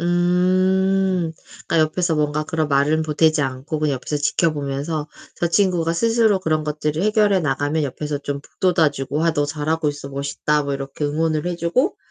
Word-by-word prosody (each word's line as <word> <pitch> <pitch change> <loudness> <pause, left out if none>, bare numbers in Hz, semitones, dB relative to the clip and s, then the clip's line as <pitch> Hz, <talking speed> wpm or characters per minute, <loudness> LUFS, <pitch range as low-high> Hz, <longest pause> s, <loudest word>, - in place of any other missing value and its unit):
음. 185 +1 +2 0.3
그러니까 165 - +1
옆에서 165 +1 -1
뭔가 150 0 0
그런 155 -1 -1
말은 145 +3 +2
보태지 155 0 +2
않고 135 +4 -3
그냥 150 -2 0
옆에서 135 +3 -3
지켜 155 +3 +1
보면서 145 +2 -3 0.3
저 170 - -1
친구가 175 -3 +2
스스로 225 0 +3
그런 155 -4 -1
것들을 150 +1 -2
해결해 210 -2 +3
나가면 145 +1 0
옆에서 145 +1 -3
좀 140 0 -4
북돋아 170 -2 +1
주고 140 +3 -3
"아 165 - +3
너 145 -2 +1
잘하고 155 +1 -1
있어. 145 -1 -5
멋있다." 140 +2 -1
뭐 140 0 -2
이렇게 135 +2 -5
응원을 155 +2 0
해 175 -1 -2
주고 175 - 0
155 Hz, 375 characters per minute, -21 LUFS, 145-175 Hz, 0.3 s, 스스로